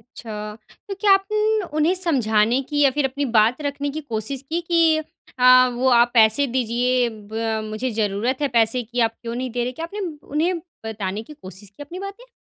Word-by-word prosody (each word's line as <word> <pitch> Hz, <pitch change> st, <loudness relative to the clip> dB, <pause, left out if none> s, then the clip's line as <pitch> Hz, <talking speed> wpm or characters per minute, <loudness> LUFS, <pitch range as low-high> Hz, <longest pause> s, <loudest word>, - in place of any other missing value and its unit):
अच्छा, 210 Hz, -2 st, -7 dB, 0.3 s
तो 395 Hz, -, -2 dB
क्या 410 Hz, 0 st, +3 dB
आपन 425 Hz, +2 st, +1 dB, 0.2 s
उन्हें 315 Hz, +4 st, +3 dB
समझाने 245 Hz, -, +2 dB
की 295 Hz, -1 st, -1 dB
या 280 Hz, -, +6 dB
फिर 285 Hz, +1 st, 0 dB
अपनी 280 Hz, +2 st, -2 dB
बात 225 Hz, +6 st, +4 dB
रखने 285 Hz, 0 st, -3 dB
की -, -, -3 dB
कोशिश 245 Hz, -1 st, -4 dB
की 335 Hz, +2 st, -1 dB
कि 330 Hz, -2 st, +3 dB, 0.4 s
अ, 255 Hz, 0 st, +7 dB
वो 255 Hz, +2 st, +1 dB
आप 240 Hz, -1 st, +4 dB
पैसे 225 Hz, +4 st, +4 dB
दीजिए 245 Hz, 0 st, +1 dB, 0.2 s
ब 225 Hz, 0 st, -2 dB
मुझे 215 Hz, +4 st, -3 dB
ज़रूरत 215 Hz, +4 st, -1 dB
है 290 Hz, -, +2 dB
पैसे 230 Hz, +2 st, +3 dB
की, 240 Hz, +2 st, -5 dB
आप 225 Hz, -1 st, +3 dB
क्यों 235 Hz, -1 st, -5 dB
नहीं 255 Hz, +1 st, -3 dB
दे 240 Hz, +1 st, -1 dB
रहे? 250 Hz, -, -2 dB
क्या 325 Hz, +6 st, -5 dB
आपने 405 Hz, +5 st, -8 dB, 0.3 s
उन्हें 330 Hz, +5 st, 0 dB, 0.3 s
बताने 210 Hz, -1 st, -4 dB
की 300 Hz, -, -12 dB
कोशिश 195 Hz, -, -11 dB
की 205 Hz, +9 st, -11 dB
अपनी 345 Hz, +6 st, -9 dB
बातें? 400 Hz, +6 st, -9 dB
255 Hz, 200 wpm, -22 LUFS, 225-305 Hz, 0.4 s, अ